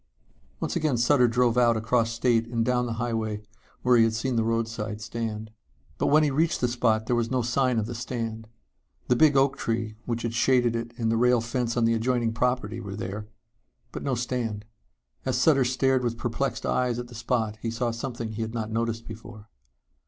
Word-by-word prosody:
Once - - -2
again 150 -5 +1
Sutter 125 +1 +4
drove 120 0 +2
out 120 -2 +4
across 115 +1 +1
state 115 -1 +1
and 115 -1 -1
down 125 0 +1
the 115 - -2
highway 110 -2 -2 0.4
where 125 -1 +5
he 115 - +6
had 115 0 +2
seen 125 +3 -1
the 115 - +2
roadside 115 -2 -2
stand. 110 -1 -5 0.5
But - - +1
when 155 +2 +5
he 150 - +2
reached 160 +4 +1
the 125 - +2
spot 115 -2 +1
there 120 - +1
was 115 -1 0
no 130 -2 0
sign 125 +1 +1
of 110 - +1
the 120 - -5
stand. 115 -2 -4 0.6
The 125 - +5
big 145 +1 +5
oak 135 0 +3
tree 110 -2 -2
which 115 -1 -2
had 115 -1 -2
shaded 120 -1 +3
it 115 0 -3
and 115 -1 0
the 115 - +2
rail 125 +1 +4
fence 120 +1 -2
on 120 - +3
the 115 - +3
adjoining 115 0 0
property 125 -2 -1
were 100 -4 -6
there. 105 0 -5 0.6
But - - -6
no 135 -2 -1
stand. 120 -3 -3 0.6
As 130 -2 0
Sutter 135 0 +4
stared 130 +1 +2
with 120 -1 -1
perplexed 120 +4 -2
eyes 125 -2 +1
at 120 0 -5
the 120 - -13
spot 110 -2 -1
he 115 - -2
saw 115 +1 -1
something 115 -1 -5
he 110 +1 -5
had 110 +1 -4
not 110 -1 -3
noticed 115 0 -2
before. 110 0 -10
115 Hz, 205 wpm, -26 LUFS, 115-125 Hz, 0.6 s, he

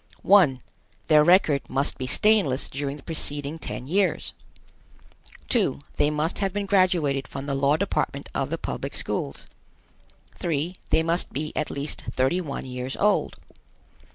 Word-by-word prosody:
1. 170 -11 +5 0.5
Their 150 -1 +7
record 155 -5 +4
must 135 +2 0
be 130 - -3
stainless 190 -6 +3
during 140 +1 -3
the 140 - -15
preceding 150 -1 -2
ten 125 -4 -6
years. 185 +3 0 1.2
2. - - +2 0.2
They 145 - +3
must 150 +2 -1
have 195 -2 0
been 205 +1 -2
graduated 180 -8 +2
from 135 0 -6
the 140 - -2
law 140 +2 +2
department 200 - -2
of - - -1
the - - -2
public - - -5
schools. - - -2 0.9
3. 170 0 -1
They 160 - +3
must 170 +2 -1
be 155 +3 -4
at 155 - -1
least 140 +2 -4
thirty 130 +8 +2
one 140 -6 -5
years 125 0 -5
old. 210 +1 +2
150 Hz, 150 wpm, -25 LUFS, 140-180 Hz, 1.2 s, Their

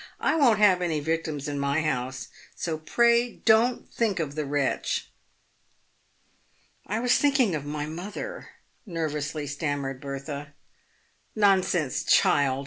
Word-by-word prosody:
I - - +1
won't 255 -9 +4
have 195 -3 +4
any 165 -4 0
victims 155 -2 -2
in 145 -1 -3
my 140 +3 0
house, 130 -3 -3 0.3
so 160 -2 -3
pray 235 +7 +2
don't 230 +2 +2
think 215 -6 -1
of 150 -4 -2
the 150 -1 -3
wretch." 140 -1 -1 0.7
" - - -37
I 215 +3 -1
was 245 +1 +3
thinking 275 -9 +3
of 150 -2 -3
my 150 0 -3
mother," 185 - -7 0.3
nervously 155 -5 -3
stammered 145 -2 -3
Bertha. 140 +1 -6 0.4
" - - -40
Nonsense, 180 -7 +2
child 135 -2 +3
155 Hz, 135 wpm, -26 LUFS, 145-205 Hz, 0.7 s, won't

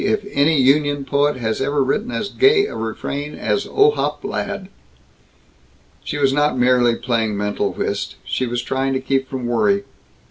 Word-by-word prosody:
if 210 0 0
any 145 +2 +3
union 145 +1 +2
poet 145 +2 +1
has 110 -2 -2
ever 140 +1 +1
written 210 - -1
as 215 -4 -3
gay 405 - +4
a - - -6
refrain 140 +6 -4
as - - -1
'Ohop 435 +1 +2
Ladd'!" - - -4 1.4
She 150 - -4
was 135 -2 +2
not 145 -1 +1
merely 125 -1 +3
playing 115 -4 -1
mental 105 0 -1
whist. - - -3
She 130 - -1
was 120 0 -2
trying 135 +1 -1
to 130 - 0
keep 135 0 -1
from 130 -2 -4
worry. 105 -4 +1
135 Hz, 165 wpm, -20 LUFS, 120-150 Hz, 1.4 s, gay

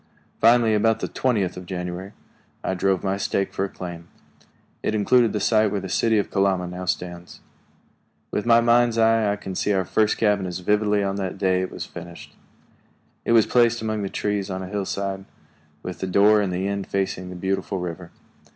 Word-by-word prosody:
Finally, 115 -1 +5
about 110 +1 +2
the - - -2
twentieth 110 -8 0
of 90 -1 -9
January, 90 +2 -5 0.5
I - - -1
drove 95 0 0
my 95 0 0
stake 100 0 -1
for 95 - -1
a - - -6
claim. 85 -3 -8 0.7
It 110 - -1
included 115 +2 +3
the 105 - -2
site 110 -1 +3
where 100 - -2
the 95 0 -7
city 110 +3 +2
of 100 - -1
Kalama 95 -2 +1
now 90 +1 -6
stands. 90 -1 -4 0.9
With 105 - -1
my 115 0 +6
mind's 120 0 +3
eye 115 -2 +3
I - - 0
can 95 -2 -7
see 105 +2 0
our 95 -1 +1
first 110 +3 +1
cabin 105 -3 +1
as 90 -1 -4
vividly 105 +2 +1
as - - 0
on 95 - -3
the 95 -2 -2
day 95 -1 0
it 95 - -3
was - - -6
finished. 85 0 -11 0.9
It - - +2
was 115 -2 +6
placed 120 -2 +2
among 110 -1 -2
the 100 - -3
trees 105 -1 -2
on 95 0 -4
a - - -6
hillside, 100 -1 -3 0.6
with 90 -1 -6
the 95 - -3
door 105 +3 +5
in 100 - -1
the 90 +2 -2
end 100 -1 -3
facing 95 -2 -2
the 90 - -8
beautiful 95 +2 -2
river. 90 -1 -6
100 Hz, 200 wpm, -23 LUFS, 95-110 Hz, 0.9 s, my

